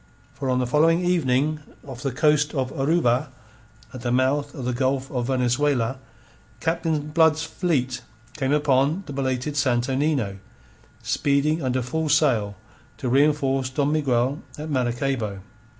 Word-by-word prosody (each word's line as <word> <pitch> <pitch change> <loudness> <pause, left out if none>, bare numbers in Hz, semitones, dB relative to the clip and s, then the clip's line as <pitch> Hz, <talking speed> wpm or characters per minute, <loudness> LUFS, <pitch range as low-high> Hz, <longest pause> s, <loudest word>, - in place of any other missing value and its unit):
For 135 - -4
on 125 - +2
the 125 - +1
following 165 +7 +3
evening, 155 -3 +1 0.3
off 130 -3 -9
the 135 - -2
coast 150 +3 +2
of 130 -1 -1
Oruba, 140 -2 +1 0.6
at 130 - -8
the 120 - -2
mouth 140 +4 +1
of 130 -5 -6
the 125 - -1
Gulf 130 +2 -1
of 125 -2 -2
Venezuela, 130 -1 +1 0.6
Captain 160 -2 -1
Blood's 160 0 +3
fleet 155 -7 -1 0.3
came 135 -3 -1
upon 145 +4 +2
the 145 - -7
belated 135 +1 -2
Santo 130 -2 +1
Nino, 130 -9 0 0.6
speeding 145 +7 +1
under 130 -1 -1
full 160 +5 -2
sail 120 -10 +2 0.4
to 130 - -3
reenforce 135 -1 +2
Don 140 +2 0
Miguel 135 -2 +1 0.2
at 155 +1 -6
Maracaybo. 120 -5 -1
135 Hz, 140 wpm, -24 LUFS, 125-150 Hz, 0.6 s, following